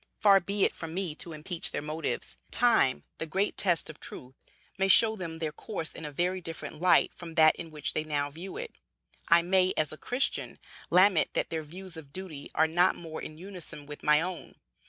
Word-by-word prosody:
Far 200 -2 +7
be 200 +2 -1
it - - 0
from 165 0 -7
me 185 -4 -1
to 165 +2 -6
impeach 160 +2 -4
their - - -3
motives. 155 0 -3
Time, 230 - +3 0.2
the 160 - -3
great 190 +6 0
test 175 -4 +1
of 155 - -6
truth, 125 +1 -5 0.4
may 195 0 +1
show 220 +4 +6
them 170 -5 -6
their 160 -2 -2
course 165 0 -5
in 160 - -7
a 150 - -5
very 180 +5 0
different 165 -1 -6
light 180 0 +4
from 165 -2 -9
that 155 -1 +6
in 165 - -7
which 150 -1 -3
they 155 - 0
now 145 -2 -2
view 175 - -8
it. 480 -1 -6 0.6
I 170 0 +6
may, 185 +1 +3
as 155 -1 +2
a - - -9
Christian, 250 - -1 0.3
lament 185 -1 +5
that - - -1
their 160 -1 -1
views 175 +3 -9
of 145 -4 -11
duty 160 -5 -7
are 160 - +5
not 175 +3 +3
more 160 -2 -7
in 155 - -8
unison 180 -5 -7
with 145 0 -9
my 150 +1 +4
own. 180 +1 -5
165 Hz, 210 wpm, -29 LUFS, 155-190 Hz, 0.6 s, Far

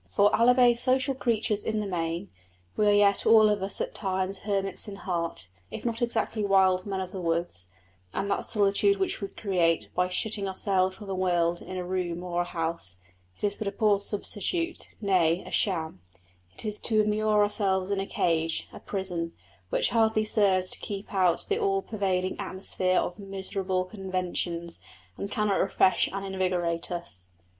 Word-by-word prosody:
For 205 0 +3
albeit 245 0 +5
social 260 +2 +3
creatures 220 -4 0
in 220 -1 -1
the 210 - -2
main, 170 0 -3 0.4
we 210 - +2
are - - +6
yet 205 -1 +4
all 220 -1 +7
of 210 -2 0
us 195 +1 0
at - - -3
times 190 -1 -2
hermits 195 -1 +2
in 205 - -6
heart, 170 - -4 0.2
if - - -7
not 235 0 -2
exactly 230 -2 -1
wild 190 -1 +3
men 195 -1 -2
of 185 -1 -6
the 190 - -6
woods; 165 - -1 0.4
and 195 - -2
that - - 0
solitude 200 -1 +3
which 195 +2 -1
we 200 - -2
create 175 -6 0
by 180 0 +1
shutting 200 +2 -1
ourselves 190 -1 +1
from 210 - -10
the 195 - -4
world 175 -2 +1
in 185 - -7
a 180 - -3
room 175 -1 -3
or 175 -1 -1
a - - -2
house, 165 - -3 0.5
is 205 -1 +1
but 215 - -4
a - - 0
poor 205 0 +2
substitute 220 - -1
nay, 185 -4 +2
a - - -9
sham: 160 - 0 0.5
it - - -4
is 210 -1 0
to 220 -2 +2
immure 210 0 +2
ourselves 195 -2 0
in 200 - 0
a 195 - -3
cage, 165 -1 0
a - - -9
prison, 175 -4 -1 0.4
which - - +1
hardly 220 -2 +2
serves 190 -4 +3
to - - -3
keep 200 0 -6
out 185 -3 +2
the 415 +2 0
all 390 -2 +1
pervading 190 -3 -1
atmosphere 185 -1 0
of 175 - -3
miserable 190 -1 -3
conventions, 180 -3 -3 0.4
and 200 - -5
cannot 210 -1 0
refresh 185 - +3
and 195 0 -4
invigorate 180 -3 -1
us. 90 - -7
195 Hz, 175 wpm, -27 LUFS, 180-210 Hz, 0.5 s, all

